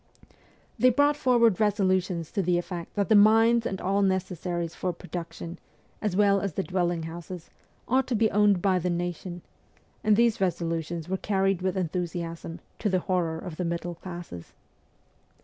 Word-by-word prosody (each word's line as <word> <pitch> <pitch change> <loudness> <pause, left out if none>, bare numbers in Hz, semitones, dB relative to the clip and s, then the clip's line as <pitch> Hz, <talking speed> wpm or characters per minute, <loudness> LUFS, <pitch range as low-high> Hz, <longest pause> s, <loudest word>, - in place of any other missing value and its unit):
They 255 - +6
brought 285 +4 +3
forward 235 -7 +3
resolutions 190 -5 +1
to 200 - 0
the 180 -1 +1
effect 175 -1 -5
that 200 -1 +1
the 220 - +4
mines 225 +3 +5
and 190 - -4
all 195 +2 +1
necessaries 180 -3 -1
for 180 - -2
pro 180 - -13
duction, 170 0 -6 0.4
as 210 -4 -1
well 200 -1 +4
as 200 -4 -2
the 190 - -1
dwelling 175 -3 -1
houses, 170 +1 -8 0.4
ought 260 +1 +2
to 250 - 0
be 220 0 +2
owned 205 -3 +3
by 190 -2 +3
the 180 +1 -1
nation; 175 0 -4 0.6
and 215 -1 +4
these 230 -2 +2
resolutions 165 -2 -2
were 190 +1 -1
carried 195 -2 0
with 185 +1 -1
enthusiasm, 170 -1 -4 0.2
to 215 - 0
the 185 -1 +1
horror 170 -3 -1
of 165 -2 -7
the 180 - -2
middle 170 +1 -3
classes. 170 - -9
185 Hz, 165 wpm, -27 LUFS, 175-205 Hz, 0.6 s, They